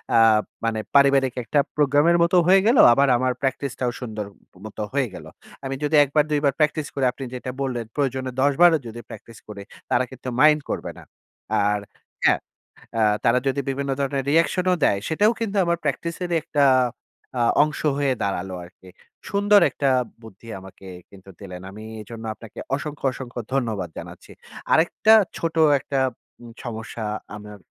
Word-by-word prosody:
আ - - +6 0.5
মানে 115 -1 -1 0.2
পারিবারিক 135 -2 +4
একটা 145 +5 +1 0.2
প্রোগ্রামের 150 +4 +3
মতোও 175 +1 +4
হয়ে 190 +1 +6
গেল 240 +3 +4 0.2
আবার 140 +2 +3
আমার 130 +1 0
practice 135 0 -2
টাও 125 -1 0
সুন্দর 110 -4 -5 0.4
মত 110 - -10 0.2
হয়ে 135 -3 +1
গেলো। - - -10 0.4
আমি 135 0 -3
যদি 150 +1 +1
একবার 145 +2 +2
দুইবার 145 -2 +2
practice 150 0 +1
করি 135 -2 0
আপনি 135 - -9
যেটা 125 0 -5
বললেন, 125 -4 -2
প্রয়োজনে 130 -2 -1
১০ 140 +1 +3
বারও 175 -2 +7
যদি 115 +1 -8
প্র্যাকটিস 115 -2 -12
করি 100 -2 -8 0.3
তারা 120 - +2
কিন্তু 130 0 -7
mind 150 0 +5
করবে - - -3
না। - - -12 0.6
আর 105 0 +1 0.4
হ্যাঁ, - - +4 0.6
আ - - +2 0.2
তারা 120 +2 +4
যদি 135 +1 0
বিভিন্ন 140 0 -2
ধরনের 135 -1 -1
reaction 170 +3 +2
ও - - +4
দেয় 100 - +3
সেটাও 205 +8 +3
কিন্তু 210 -3 -2
আমার 170 0 +1
practice 165 +4 -2
এর 175 - -4
ই - - +4
একটা 150 -3 +1 0.8
আ - - +2 0.2
অংশ 150 -1 -4 0.2
হয়ে 140 -2 +1
দাঁড়ালো 95 -1 -3
আরকি। 90 +1 -16 0.4
সুন্দর 205 +1 +4
একটা 140 - 0 0.3
বুদ্ধি 110 +1 -14
আমাকে 95 0 -14 0.2
কিন্তু 95 0 -16
দিলেন। 90 -3 -9
আমি 110 +2 -10 0.2
এজন্য 115 +2 -9
আপনাকে 110 -1 -12 0.2
অসংখ্য, 145 0 -6
অসংখ্য 125 -1 -7
ধন্যবাদ 110 -9 -1
জানাচ্ছি। - - -10 0.4
আরেকটা 175 +7 +4 0.2
ছোট 165 -1 -3 0.2
একটা 135 0 -3 0.5
উব 115 - -11
সমস্যা 110 -1 -6 0.3
আমার 105 0 -10
135 Hz, 165 wpm, -23 LUFS, 115-150 Hz, 0.8 s, বারও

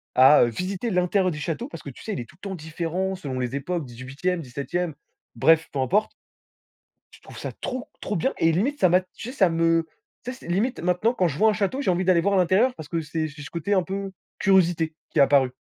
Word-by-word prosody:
à, 130 +3 +7
heu, - - +3
visiter 185 - -3
l'intérieur 180 0 +2
des 150 - -5
châteaux 170 - -3
parce - - -9
que, 140 - -7
tu 125 - -12
sais, 220 - -3
il - - -3
est - - -7
tout 160 - -18
le - - -6
temps 190 - -4
différent, 170 +4 -3
selon 135 -8 -5
les 125 +1 -2
époques 165 +2 -3
18e, 130 +9 -3
17e. 150 +5 -3 0.4
Bref, 160 0 +4
peu 135 - -2
importe 200 +11 +2 1.0
je - - -17
trouve - - -12
ça - - -5
trop, 255 +2 -5
trop 210 - -3
bien 265 +11 0
et 165 - +3
limite, 250 - 0
ça 185 - +6
m'a, 180 +2 +5
tu 185 +5 -10
sais, - - -8
ça 195 -9 +4
me, 165 0 +2 0.4
tu 250 - -4
sais, 255 - -12
limite, 220 +9 0
maintenant 180 +7 +1
quand 185 -7 +2
je 140 - -5
vois 220 +1 +5
un - - +1
château, 210 +5 -1
j'ai 190 - +2
envie 180 +1 +1
d'aller 180 -2 +4
voir 200 +3 +1
à - - +4
l'intérieur 195 +8 +3
parce 150 -2 -9
que 165 - -1
c'est 155 0 -3
j 145 0 -11
ce 145 - -9
côté 175 +5 -1
un 185 - +3
peu 195 +2 -4 0.3
curiosité 175 -4 +3 0.2
qui - - -2
est - - +8
apparu. 135 -2 +4
180 Hz, 250 wpm, -24 LUFS, 155-195 Hz, 1.0 s, est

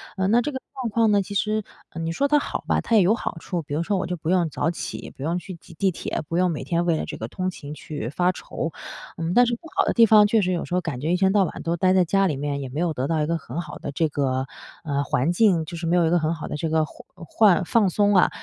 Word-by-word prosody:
呃， 190 -1 0
那 235 +4 +4
这 295 - -3
个 265 - -5
状 255 -4 -3
况 225 0 +3
呢， 205 -1 +4
其 200 - -8
实 215 +2 0 0.3
嗯， 165 0 -5
你 165 - -1
说 275 +12 +1
它 295 +1 +4
好 - - -4
吧， - - +2
它 230 - 0
也 210 - +7
有 185 +4 +4
好 205 - -5
处。 175 0 -3
比 145 - -7
如 155 - 0
说 200 +3 0
我 180 - -1
就 180 - -2
不 160 -1 -5
用 180 -2 +3
早 150 +2 -1
起、 - - -6
不 135 - -10
用 165 +4 0
去 185 0 -9
挤 170 - -16
地 190 +4 +1
铁， 165 - -4
不 165 - -1
用 185 0 +3
每 150 - -4
天 170 -1 0
为 170 - +2
了 - - -3
这 - - -7
个 110 - -5
通 185 +9 -3
勤 150 -5 -8
去 150 -5 -6
发 175 +6 +1
愁。 165 -2 -5 0.5
嗯， 165 +1 -2
但 245 +4 +6
是 235 - 0
不 - - -17
好 - - +3
的 - - +1
地 230 - +6
方， 215 -1 +6
确 220 +2 +3
实 185 -1 0
有 170 - -2
时 - - -7
候 - - +3
感 150 -8 -5
觉 160 - -1
一 180 - +3
天 190 0 +2
到 205 -2 +4
晚 180 - -5
都 170 0 0
待 185 +2 +3
在 185 - +4
家 195 +3 +2
里 150 - -2
面， 140 0 -3
也 135 - -5
没 140 +5 -5
有 170 -2 0
得 135 -1 -2
到 160 -1 0
一 - - +1
个 165 +2 0
很 140 +2 -6
好 170 - -7
的 - - -5
这 160 +3 +1
个， 130 -2 -1 0.4
呃， 145 -3 -1
环 140 +3 0
境。 175 -4 +3
就 165 - -8
是 165 0 -4
没 175 +2 +3
有 170 - +4
一 160 - +2
个 175 - +4
很 155 +1 0
好 160 - -7
的 - - -4
这 160 +2 -2
个 160 0 +2
环 - - -15
呃， 165 - -11
换 200 -4 +4
放 210 +1 +3
松， 205 +2 +2
啊。 185 - +5
175 Hz, 340 characters per minute, -24 LUFS, 155-195 Hz, 0.5 s, 也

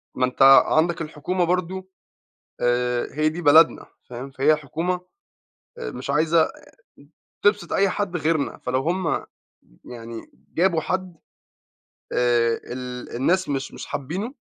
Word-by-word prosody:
ما 130 - +2
أنت 125 - -6 0.2
عندك 165 +2 +1
الحكومة 160 +4 -2
برضه 185 +2 -2 0.7
آآ 120 0 +1
هي 155 +2 +2
دي 165 +3 -6
بلدنا 160 +1 +5 0.2
فاهم، 125 +3 -7
فهي 140 +4 +3
الحكومة 165 +5 -2 0.8
مش 465 - -6
عايزة 160 +3 +3 1.0
تبسط 205 -4 +2
أي 200 0 +3
حد 185 -2 -2
غيرنا، 155 -2 -1
فلو 125 +1 -1
هُم 170 +2 -1 0.6
يعني 115 -1 -8 0.3
جابوا 170 -2 +2
حد 185 +1 -3 1.0
آآ 120 -1 +2
ال 125 -1 -7
الناس 180 +9 +1
مش 140 0 -3
مش - - -8
حابينّه، 185 - -4
155 Hz, 120 wpm, -23 LUFS, 130-180 Hz, 1.0 s, بلدنا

